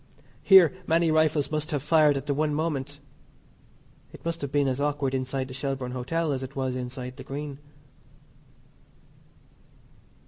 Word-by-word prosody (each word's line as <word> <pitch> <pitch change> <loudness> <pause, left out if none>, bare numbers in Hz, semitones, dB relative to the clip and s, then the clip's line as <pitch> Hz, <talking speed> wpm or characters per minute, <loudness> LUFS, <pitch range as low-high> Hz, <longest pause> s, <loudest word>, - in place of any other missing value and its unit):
Here 190 -6 +7
many 165 0 +3
rifles 155 -2 +2
must 155 0 -2
have 145 -4 -2
fired 150 -2 +4
at 135 - -5
the 145 - 0
one 150 +1 0
moment. 145 -3 -3 1.1
It - - -14
must 165 0 -3
have 140 -2 -4
been 145 -1 +2
as 130 +1 -1
awkward 145 -2 -1
inside 130 0 -2
the 130 - -9
Shelbourne 135 -1 -3
Hotel 150 +6 -2
as 135 -2 -2
it 130 +1 -7
was 130 -2 -2
inside 125 0 -6
the - - -8
Green. 140 0 -6
140 Hz, 150 wpm, -26 LUFS, 130-155 Hz, 1.1 s, Here